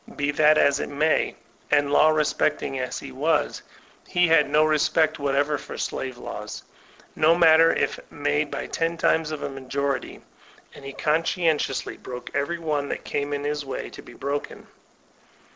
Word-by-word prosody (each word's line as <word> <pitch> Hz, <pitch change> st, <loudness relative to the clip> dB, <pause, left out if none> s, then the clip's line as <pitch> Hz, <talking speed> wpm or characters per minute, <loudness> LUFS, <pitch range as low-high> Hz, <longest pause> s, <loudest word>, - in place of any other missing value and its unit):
Be 145 Hz, 0 st, 0 dB
that 155 Hz, +1 st, +4 dB
as 140 Hz, -1 st, +3 dB
it -, -, -3 dB
may, 155 Hz, +2 st, +1 dB, 0.3 s
and 145 Hz, -1 st, +2 dB
law 155 Hz, -, +6 dB
respecting 150 Hz, -3 st, 0 dB
as 125 Hz, 0 st, -4 dB
be 140 Hz, -, -8 dB
was, 150 Hz, +5 st, 0 dB, 0.5 s
be 180 Hz, 0 st, +4 dB
had 150 Hz, -3 st, +4 dB
no 150 Hz, +1 st, +4 dB
respect 155 Hz, +1 st, +2 dB
whatever 145 Hz, +1 st, 0 dB
for -, -, -9 dB
slave 130 Hz, -2 st, -4 dB
laws, 105 Hz, -2 st, -7 dB, 0.5 s
no 160 Hz, +2 st, +4 dB
matter 165 Hz, -1 st, +6 dB
if -, -, -1 dB
made 145 Hz, 0 st, -1 dB
by -, -, -4 dB
ten 165 Hz, 0 st, -2 dB
times 160 Hz, -1 st, +2 dB
of 155 Hz, -1 st, -5 dB
a -, -, -2 dB
majority; 135 Hz, 0 st, -3 dB, 0.5 s
and -, -, -13 dB
he 140 Hz, -, -6 dB
oon 155 Hz, +4 st, +1 dB
sdentiousty 160 Hz, -5 st, -1 dB
broke 125 Hz, -1 st, -8 dB
every 145 Hz, +5 st, -1 dB
one 150 Hz, -4 st, -2 dB
that -, -, -4 dB
came 145 Hz, 0 st, -2 dB
in 145 Hz, 0 st, -2 dB
his 145 Hz, 0 st, -2 dB
way 135 Hz, -, -6 dB
to -, -, -10 dB
be -, -, -14 dB
broken. 140 Hz, +3 st, -5 dB
145 Hz, 170 wpm, -24 LUFS, 140-155 Hz, 0.5 s, law